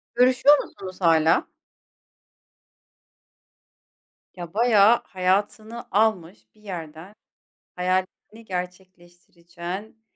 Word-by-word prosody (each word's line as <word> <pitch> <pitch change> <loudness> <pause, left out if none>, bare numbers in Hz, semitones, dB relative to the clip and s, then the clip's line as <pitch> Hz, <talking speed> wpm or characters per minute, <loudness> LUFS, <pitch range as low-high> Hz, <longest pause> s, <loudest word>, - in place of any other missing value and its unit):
Görüşüyor 255 +4 +5
musunuz 185 0 -9
hâlâ? 165 -1 +3 2.9
Ya, 175 -1 -9
bayağı 225 0 +4
hayatını 205 +5 -2
almış 200 -3 -1
bir 215 - -25
yerden, 175 -1 -9 0.6
hayallerini 185 +5 -3
gerçekleştireceğin 180 +2 -9
185 Hz, 65 wpm, -23 LUFS, 175-215 Hz, 2.9 s, Görüşüyor